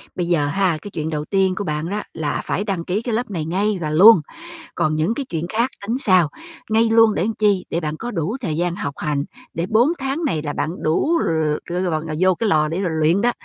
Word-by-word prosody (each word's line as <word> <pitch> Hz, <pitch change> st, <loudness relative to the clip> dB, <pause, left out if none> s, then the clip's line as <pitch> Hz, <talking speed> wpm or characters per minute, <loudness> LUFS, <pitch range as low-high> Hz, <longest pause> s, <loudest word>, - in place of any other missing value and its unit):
Bây 175 Hz, -2 st, -2 dB
giờ 160 Hz, -5 st, +2 dB
ha, 180 Hz, +1 st, +1 dB
cái 205 Hz, -, -9 dB
chuyện 155 Hz, -2 st, -3 dB
đầu 150 Hz, -1 st, -3 dB
tiên 190 Hz, +1 st, +1 dB
của 205 Hz, -, -3 dB
bạn 155 Hz, -1 st, -3 dB
đó 210 Hz, +2 st, -2 dB
là 150 Hz, -2 st, -2 dB
phải 200 Hz, -, -1 dB
đăng 190 Hz, -5 st, -3 dB
ký 195 Hz, +4 st, -1 dB
cái 235 Hz, -1 st, -3 dB
lớp 230 Hz, -1 st, -2 dB
này 165 Hz, -5 st, -3 dB
ngay 195 Hz, +5 st, 0 dB
và 155 Hz, -, -2 dB
luôn, 185 Hz, +4 st, +8 dB, 0.5 s
còn 155 Hz, 0 st, +1 dB
những 160 Hz, +8 st, +1 dB
cái 280 Hz, +2 st, -4 dB
chuyện 165 Hz, 0 st, -3 dB
khác 230 Hz, +5 st, +1 dB, 0.2 s
tính 235 Hz, -, 0 dB
sau, 185 Hz, -, +3 dB, 0.4 s
ngay 225 Hz, +1 st, +3 dB
luôn 225 Hz, -1 st, +5 dB
để 185 Hz, -, 0 dB
chi? 205 Hz, -4 st, +2 dB
Để 165 Hz, -, -1 dB
bạn 155 Hz, -2 st, -4 dB
có 240 Hz, +6 st, -5 dB
đủ 190 Hz, -, -2 dB
thời 160 Hz, -9 st, -2 dB
gian 175 Hz, 0 st, 0 dB
học 145 Hz, -7 st, -4 dB
hành, 145 Hz, -1 st, -1 dB, 0.3 s
để 165 Hz, -, -2 dB
4 235 Hz, +6 st, +4 dB
tháng 270 Hz, +5 st, -2 dB
này 160 Hz, -, 0 dB
là 145 Hz, -1 st, -4 dB
bạn 165 Hz, +4 st, -3 dB
đủ 305 Hz, -, +2 dB
l -, -, -1 dB, 0.5 s
lò 175 Hz, -3 st, -1 dB, 0.2 s
vô 185 Hz, 0 st, +4 dB
cái 225 Hz, +4 st, -1 dB
lò 155 Hz, -3 st, +3 dB
để 165 Hz, +5 st, -2 dB
rồi 180 Hz, -, -1 dB
luyện 165 Hz, +6 st, +3 dB
đó, 245 Hz, +2 st, +3 dB
185 Hz, 245 wpm, -21 LUFS, 160-215 Hz, 0.5 s, luôn